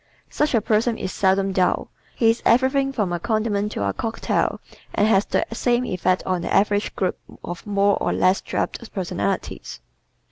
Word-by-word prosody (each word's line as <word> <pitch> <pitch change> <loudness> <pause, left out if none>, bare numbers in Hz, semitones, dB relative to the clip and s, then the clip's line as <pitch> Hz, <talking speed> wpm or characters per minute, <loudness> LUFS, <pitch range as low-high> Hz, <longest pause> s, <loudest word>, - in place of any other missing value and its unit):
Such 300 -3 +1
a 225 - +3
person 220 +2 +1
is 185 - -4
seldom 195 0 +2
dull. 185 -1 0 0.2
He 225 -1 +4
is 230 - -4
everything 265 +3 +3
from 210 -9 -1
a 175 - -1
condiment 215 -2 -1
to 100 - -1
a 100 - -1
cocktail 225 0 -1 0.4
and 205 - +3
has 200 -2 +3
the - - +1
same 240 +1 +1
effect 185 -2 0
on 185 -2 0
the - - -4
average 205 +1 +2
group 185 -2 -1 0.2
of 175 0 -7
more 200 0 +2
or - - +1
less 185 +1 +2
drab - - -2 0.2
personalities. 135 - -3
205 Hz, 175 wpm, -22 LUFS, 185-230 Hz, 0.4 s, He